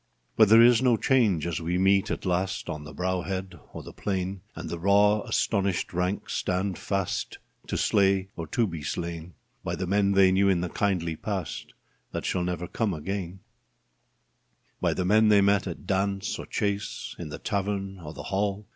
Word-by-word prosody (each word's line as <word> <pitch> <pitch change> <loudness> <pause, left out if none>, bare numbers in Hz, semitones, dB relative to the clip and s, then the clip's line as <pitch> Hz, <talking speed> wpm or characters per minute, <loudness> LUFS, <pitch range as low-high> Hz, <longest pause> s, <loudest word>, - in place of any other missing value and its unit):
But 110 -2 +6
there 115 +2 +8
is 120 0 +6
no 125 -3 +4
change 110 - +2
as 85 -1 -2
we 85 +2 -1
meet 95 +1 +3
at - - -3
last 95 +1 -1
On 75 -1 -6
the 75 - -9
brow 90 +4 -1
head 95 -1 -5
or - - -8
the - - -10
plain, 95 -1 -3
And 85 - -6
the 85 - -5
raw 100 +3 +4
astonished 100 -4 0
ranks 90 +3 -2
stand 95 0 -1
fast 95 -2 -2 0.3
To - - -2
slay 95 -1 +2
or 85 -1 -5
to 115 +9 +1
be 85 -6 -5
slain 85 +2 -5 0.3
By - - -2
the 95 - -3
men 100 +1 +2
they 95 -1 +5
knew 100 +1 +3
in 90 -3 +2
the 90 - -2
kindly 85 -5 -1
past 95 -3 -5 0.4
That - - -3
shall 90 - 0
never 90 0 -2
come 105 -2 -1
again 95 +2 -5 0.7
— - - -44
By - - +1
the 90 - -1
men 110 +3 +4
they 105 -1 +6
met 100 0 +3
at - - -7
dance 100 +1 -1
or - - -7
chase, 100 -1 -3
In 85 -3 -6
the - - -6
tavern 100 -1 -3
or 75 -3 -8
the - - -7
hall. 100 +1 -1
95 Hz, 190 wpm, -27 LUFS, 90-100 Hz, 0.7 s, there